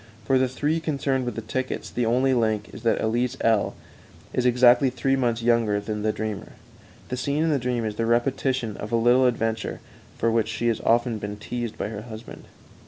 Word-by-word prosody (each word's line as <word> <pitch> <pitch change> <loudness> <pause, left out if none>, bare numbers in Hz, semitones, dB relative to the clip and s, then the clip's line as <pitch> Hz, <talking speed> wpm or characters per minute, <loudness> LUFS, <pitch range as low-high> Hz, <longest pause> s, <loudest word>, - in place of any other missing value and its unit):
For 130 +3 +3
the 130 - +3
three 145 +5 -1
concerned 140 -4 -1
with 120 - -3
the 115 - -3
tickets, 130 +4 -3
the 120 -2 0
only 130 +3 +3
link 110 -3 0
is - - -9
that 115 -1 +2
Elise 120 +3 0
L 110 -3 +2 0.6
is 125 0 +2
exactly 125 +1 +5
three 135 +2 0
months 120 -3 0
younger 115 -3 +2
than 105 +1 -4
the 110 0 +1
dreamer. 110 -2 -5 0.6
The 125 - -3
scene 140 +5 0
in 165 - +2
the 145 - +2
dream 120 -2 -1
is 105 -1 -4
the 115 - 0
repetition 120 -1 0
of 105 - -6
a - - +2
little 120 +3 +4
adventure 115 -2 -1 0.4
for 115 - +1
which 115 -1 +1
she 120 - -1
has 115 - -1
often 120 -1 +2
been 105 0 -5
teased 120 +1 -5
by - - -3
her 105 -1 -6
husband. 110 0 -10
120 Hz, 205 wpm, -25 LUFS, 110-130 Hz, 0.6 s, exactly